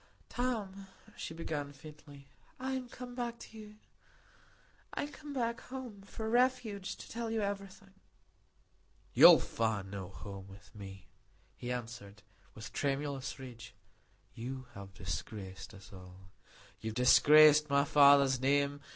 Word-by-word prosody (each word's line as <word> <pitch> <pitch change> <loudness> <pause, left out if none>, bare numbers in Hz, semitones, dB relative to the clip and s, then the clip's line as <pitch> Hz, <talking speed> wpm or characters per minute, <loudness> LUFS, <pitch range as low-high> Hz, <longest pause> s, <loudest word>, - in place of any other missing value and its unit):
"Tom," 205 -6 -3 0.3
she - - -6
began 150 -3 -4
faintly, 145 -1 -14 0.3
"I 260 +1 -3
am 260 -2 -4
come 245 +1 -9
back 240 -1 -4
to 225 - -13
you,—I 210 0 -13
am 290 - -5
come 295 0 -10
back 235 -4 -2
home—for 220 -4 -7
refuge—to 240 -5 0
tell 230 0 -4
you 225 -1 -1
everything." 195 -1 -5 1.2
"You - - +10
will - - +9
find 105 -4 -2
no 95 -3 -6
home 95 +1 -9
with 95 -1 -15
me," 95 -2 -10 0.5
he 125 0 -5
answered, 115 -4 -7 0.3
with 110 - -9
tremulous 140 -1 -2
rage. 120 -4 -10 0.6
"You 130 +3 -6
have 100 -1 -11
disgraced 95 +3 -6
us 95 0 -14
all. 90 0 -13 0.5
You 110 - -4
have 110 - -7
disgraced 150 +4 +7
my 140 0 +3
father's 140 -2 +6
name. 140 +2 +1
140 Hz, 130 wpm, -33 LUFS, -, 1.2 s, You